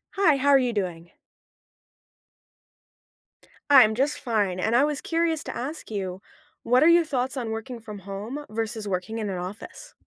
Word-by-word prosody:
Hi. 370 -7 +4
How 275 +1 +1
are 275 - +7
you 245 -2 0
doing? 175 -4 -4 2.6
I'm 220 -5 +7
just 275 +5 0
fine, 205 -7 -1
and 220 +5 +1
I 255 - +5
was 295 -1 -1
curious 330 -1 -1
to - - -6
ask 285 +4 -6
you, 190 -3 -4 0.4
what 250 +3 +4
are 325 - +6
your 340 0 +5
thoughts 265 -3 -2
on 235 -3 -3
working 230 +2 -6
from 210 -2 -9
home 200 +8 -6
vs. 220 0 -4
working 195 +3 -3
in 215 -2 -3
an 190 - -3
office? 200 - -8
230 Hz, 165 wpm, -25 LUFS, 205-280 Hz, 2.6 s, are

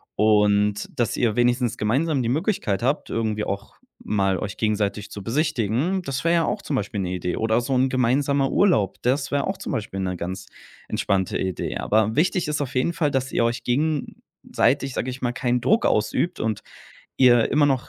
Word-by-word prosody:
und, 105 -1 +2
dass 120 -2 0
ihr 115 -4 +1
wenigstens 120 0 +1
gemeinsam 135 +7 +1
die 115 - -1
Möglichkeit 140 - 0
habt, 135 +5 0
irgendwie 110 -2 -1
auch 100 0 -5 0.3
mal 95 -2 0
euch 100 - -5
gegenseitig 105 -1 -1
zu 100 - -7
besichtigen. 150 - 0
Das 135 -6 -4
wäre 170 - +2
ja 165 -1 +3
auch - - -2
zum 145 - -2
Beispiel 100 -3 -2
'ne 90 -1 -2
Idee 90 -1 -2
oder 110 +2 +1
so 130 +3 -2
'n 130 +1 +3
gemeinsamer 135 +2 +1
Urlaub. 110 - +2
Das 135 +3 +1
wäre 140 -1 0
auch 190 0 -3
zum - - -5
Beispiel 100 -3 -4
'ne 90 -1 -2
ganz 95 +2 -5 0.4
entspannte 95 -2 0
Idee. 95 -3 -3
Aber 110 +1 +1
wichtig 175 +1 +1
ist 150 -1 -1
auf 140 -1 -4
jeden 130 +7 +1
Fall, 150 -4 0
dass 135 0 -1
ihr - - +1
euch 120 +1 -1
gegenseitig, 140 -1 -1
sage 130 - -2
ich 130 - -9
mal, 120 -1 -1
keinen 125 -2 0
Druck 220 +4 +2
ausübt 170 +10 0
und 110 -2 -2 0.6
ihr 120 -3 +5
immer 150 +1 +4
noch 135 -3 0
120 Hz, 190 wpm, -23 LUFS, 105-140 Hz, 0.6 s, ihr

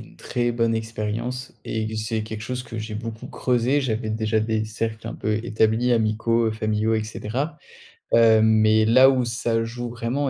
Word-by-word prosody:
une - - -15
très 120 -1 -1
bonne 115 -1 +1
expérience 115 +3 -4
et 110 -1 -2
que 110 - -5
c'est 110 0 -2
quelque 110 0 -6
chose 125 +1 -4
que 115 -2 -8
j'ai 110 0 -5
beaucoup 110 +1 -6
creusé. 125 +3 +1
J'avais 110 -4 -2
déjà 110 0 0
des 110 0 0
cercles 110 0 -4
un 115 - -5
peu 105 0 -1
établis, 110 +2 +2
amicaux, 115 +1 +1
heu, - - +1
familiaux, 110 0 0
et 110 -1 0
cetera. 130 +8 -4 0.6
Heu, 115 -1 +6
mais 110 0 +4
là 130 +4 +7
où 130 -2 +2
ça 115 -1 -1
joue 120 +1 -5
vraiment 120 +4 -2
115 Hz, 185 wpm, -23 LUFS, 110-120 Hz, 0.6 s, là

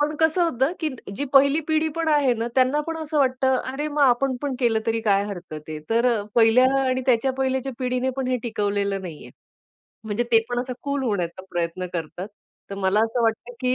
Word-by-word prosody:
पण 300 +1 0
कसं 320 +3 +3
होतं, 270 -2 +1
की 315 - 0 0.3
जी 285 - -2
पहिली 280 +3 +5
पिढी 315 0 +2
पण 330 -1 0
आहे 290 -4 +3
ना, 230 +1 -3
त्यांना 260 +3 +3
पण 330 -1 -3
असं 310 -1 -2
वाटतं, 260 -1 +2 0.2
"अरे, 290 +3 -3
मग 295 0 -2
आपण 260 0 +3
पण 280 -2 -2
केलं 230 -3 +2
तरी 225 0 0
काय 200 -2 +2
हरकत 180 -5 -8 0.2
आहे." 155 -1 -5
तर 235 +2 +3
अ, 215 - -1
पहिल्या 235 +2 +5 0.2
आणि 260 0 0
त्याच्या 255 +1 +2
पहिल्याच्या 265 0 -1
पिढीने 255 0 -1
पण 265 -1 -2
हे 255 - +1
टिकवलेलं 200 -3 -1
नाहीये. 165 -4 -9 0.7
म्हणजे 220 +3 -1
ते 225 - +8
पण 245 0 -1
असा 255 0 -4
कूल 280 -1 -2
होण्याचा 185 -4 -2
प्रयत्न 175 +1 -2
करतात. 175 +3 -5 0.4
तर - - -4
मला 195 +2 +2
असं 230 +2 -1
वाटतं, 225 +2 -1
की 255 0 +1
250 Hz, 205 wpm, -23 LUFS, 210-275 Hz, 0.7 s, ते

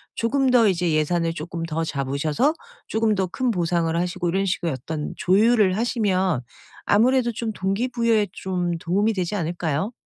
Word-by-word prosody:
조금 265 +3 +1
더 235 -4 +5
이제 175 -2 0
예산을 165 +2 +1
쪼끔 165 +1 -6
더 165 0 -2
잡으셔서 145 - 0 0.3
쪼금 220 -1 +1
더 190 - 0
큰 245 +8 -2
보상을 170 -3 0
하시고 175 +1 -1
이런 195 +3 0
식으로 175 -3 -1
약간 150 +4 -5
조율을 205 0 +3
하시면 190 - 0 0.4
아무래도 240 +3 +3
좀 225 0 -3
동기부여에 220 +2 0
좀 175 -2 -2
도움이 200 +7 0
되지 185 +1 -2
않을까요? 170 +2 -2
185 Hz, 345 characters per minute, -23 LUFS, 165-220 Hz, 0.4 s, 더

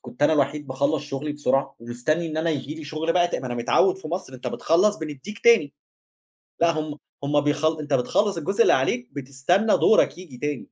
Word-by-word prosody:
كنت 125 +2 -8
أنا 145 - +5
الوحيد 145 0 0
باخلّص 140 +3 -1
شُغلي 145 +1 -4
بسرعة 135 -1 -1
ومستنّي 125 +8 -2
إن 155 -1 -5
أنا 165 +1 0
ييجي 150 -1 -4
لي 160 -1 -9
شُغل 155 +3 -2
بقى 175 0 +3
تا - - -3
ما 130 - -6
أنا 120 - -4
متعوِّد 180 +10 +2
في 160 - -8
مصر 170 -5 -5
أنت 125 - -9
بتخلّص 200 +6 +2
بندّيك 160 +7 -7
تاني، 225 -12 +5 0.9
لأ، 170 0 +5
هُم 155 -1 -5 0.3
هُم، 145 +1 +2
بيخل 155 +2 0
أنت 150 -1 -4
بتخلّص 200 +10 +1
الجزء 195 +8 0
اللي - - +5
عليك، 125 -2 0
بتستنى 140 - +1
دورك 175 +5 +3
ييجي 170 -9 -11
تاني. 145 0 -3
150 Hz, 200 wpm, -24 LUFS, 135-170 Hz, 0.9 s, أنا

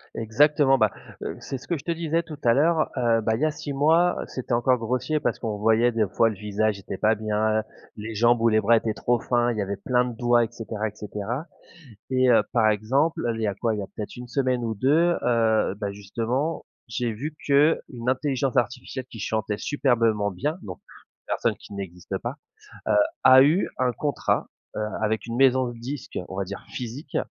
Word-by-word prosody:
Exactement, 135 +4 +3
bah, 110 -4 +3 0.3
heu, - - -5
c'est 135 - -5
ce 125 - -15
que 170 - 0
je 140 - -11
te 170 - -2
disais 165 0 -1
tout 155 -2 -9
à 115 - +5
l'heure, 155 +4 +2
heu, 115 -2 +2
bah, 110 +1 +1
il 110 - -5
y - - +4
a 155 - +1
6 145 -1 -6
mois, 160 +5 +3
c'était 130 -1 -4
encore 125 +2 +3
grossier 125 +6 -1
parce - - -1
qu'on 110 -3 -3
voyait 115 +3 +3
des 110 -3 +1
fois 115 +5 +2
le 110 - -5
visage 105 +1 -1
était 95 0 -6
pas 110 +3 +3
bien, 110 0 0 0.3
les 110 +1 -6
jambes 120 +2 +3
ou 115 - +4
les 110 0 +3
bras 115 +3 +5
étaient 110 -1 -1
trop 120 +2 0
fins, 120 +1 +1
il 115 - -4
y - - 0
avait 100 0 -3
plein 125 +2 +1
de 120 -2 -5
doigts 120 0 +3
et - - -1
cetera 110 -2 -4
et 105 - -9
cetera. 105 +7 -5 0.6
Et 130 -1 +3
heu, 120 - +5
par 110 -3 +4
exemple 130 +10 +1
il 115 - -5
y 110 - +1
a 100 - 0
quoi, 110 +2 -1
il - - -4
y - - -2
a - - -7
peut-être 105 - -6
1 125 0 -8
semaine 130 -1 0
ou 115 -1 -1
2, 160 - +3
heu, 110 -4 +2
bah 100 -1 -4
justement, 115 +10 -3 0.2
j'ai 115 +1 -2
vu 145 +8 -5
qu'une 140 -4 +2
intelligence 130 0 0
artificielle 125 +2 -2
qui 115 - -10
chantait 110 0 -2
superbement 115 -7 +1
bien, 145 - -2
donc, 90 -2 -8
une - - -21
personne - - 0
qui - - -13
n'existe 90 -3 -5
pas, - - -4 0.5
heu, - - +3 0.3
a 130 0 +9
eu 155 +8 +3
un 125 -1 +2
contrat, 145 +2 -1 0.3
heu, - - -2 0.2
avec 110 +1 0
une 115 0 -4
maison 130 -1 +4
de 120 -1 -8
disque 130 +3 -6
on 95 - -7
va 100 - -1
dire 100 +1 -8
physique, 130 +4 -6
120 Hz, 220 wpm, -25 LUFS, 110-135 Hz, 0.6 s, a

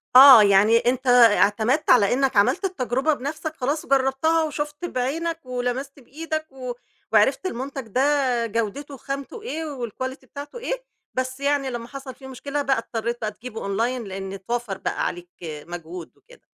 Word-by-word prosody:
آه، 260 -4 +11
يعني 205 +3 +5
أنت 250 +2 0
اعتمدت 235 +2 +4
على 205 -4 +5
إنك 265 -3 +1
عملت 210 - +3
التجربة 270 - 0
بنفسك. 310 +3 -5
خلاص، 285 +3 -2
جرَّبتها، 275 +4 +2
وشُفت 295 +2 -4
بعينك، 325 +5 -2
ولمست 255 +3 -3
بإيدك، 310 +4 -5
و 255 -2 -6 0.4
وعرفت 245 - +3
المنتج 270 -5 -4
ده 250 +5 0 0.5
جودته، 230 +6 -3
خامته 275 - -6
إيه، 375 -8 -4 0.2
والQuality 260 +4 -5
بتاعته 290 +9 -9
إيه. - - -4 0.3
بس 260 +1 -3
يعني، 280 -1 +1
لمّا 240 -1 -5
حصل 270 -1 -8
فيه 265 0 -12
مشكلة 280 +2 -4
بقى، 270 -1 +1
اضطريت 230 +1 -3
بقى 215 -1 -2
تجيبه 225 +1 -8 0.2
Online، 245 +3 0
لأن 195 0 -6
اتوفّر 205 +1 -4
بقى - - -2
عليك 175 0 -5
مجهود 165 +2 -8
وكده. - - -20
260 Hz, 150 wpm, -23 LUFS, 230-285 Hz, 0.5 s, آه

